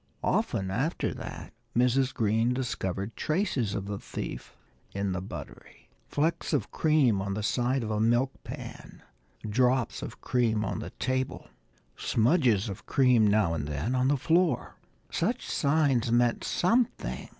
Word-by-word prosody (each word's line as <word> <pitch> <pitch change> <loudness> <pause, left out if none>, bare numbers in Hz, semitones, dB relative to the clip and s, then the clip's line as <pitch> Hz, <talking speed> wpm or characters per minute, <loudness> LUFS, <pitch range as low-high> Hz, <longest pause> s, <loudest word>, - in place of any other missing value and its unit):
Often, 95 -1 0
after 135 - -1
that, - - -8 0.2
Mrs. 125 +2 +3
Green 115 +3 +1
discovered 100 -5 -3
traces 155 - 0
of 95 - -3
the 100 0 -4
thief - - -7 0.4
in 100 -1 -1
the 95 0 -2
buttery. 95 - -10 0.2
Flecks 155 +3 -1
of - - 0
cream 140 -10 +3
on 100 0 -2
the 105 - -3
side 125 +3 +1
of 110 - -3
a 105 - 0
milk 120 +4 +3
pan, - - -9 0.4
drops 125 +2 +1
of - - -7
cream 110 -3 +1
on - - -3
the - - -5
table, 130 0 -3 0.5
smudges 120 - +2
of 100 -2 -7
cream 125 -5 +4
now 100 -5 +3
and 75 -3 -3
then 75 - -2
on 130 0 +2
the 145 +1 +3
floor! 165 -1 +1 0.4
Such - - -1
signs 140 -5 +2
meant 120 0 +2
something. 230 +7 0
120 Hz, 145 wpm, -28 LUFS, 105-135 Hz, 0.5 s, cream